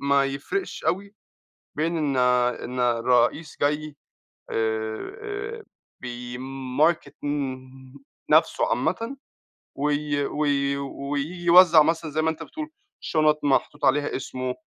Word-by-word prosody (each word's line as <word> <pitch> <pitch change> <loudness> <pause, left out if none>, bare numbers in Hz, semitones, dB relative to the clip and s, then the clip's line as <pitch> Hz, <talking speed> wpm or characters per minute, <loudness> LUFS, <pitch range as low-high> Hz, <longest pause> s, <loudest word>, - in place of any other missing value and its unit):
ما 140 0 +3
يفرقش 140 - -4
أوي 195 +5 -1 0.6
بين 165 +3 0
إن 145 -4 0 0.5
إن 125 +1 -5
الرئيس 125 +5 +2
جاي 150 +1 0 0.6
آآ 405 - -3 0.4
بيmarket 130 +5 -1
م 140 -3 -1 0.7
نفسه - - +4
عامةً، 235 +5 -1 0.6
وي 145 0 0
وي 140 -1 0
وييجي 140 +5 -4
يوزّع 170 -2 +8
مثلًا 165 -1 -1
زي 155 +2 0
ما 160 - +2
أنت 160 - -4
بتقول 310 0 -7 0.3
شُنَط 155 -1 +2
محطوط 140 -2 +1
عليها 145 +2 +2
اسمه، 130 -1 -4
145 Hz, 105 wpm, -25 LUFS, 135-165 Hz, 0.7 s, يوزّع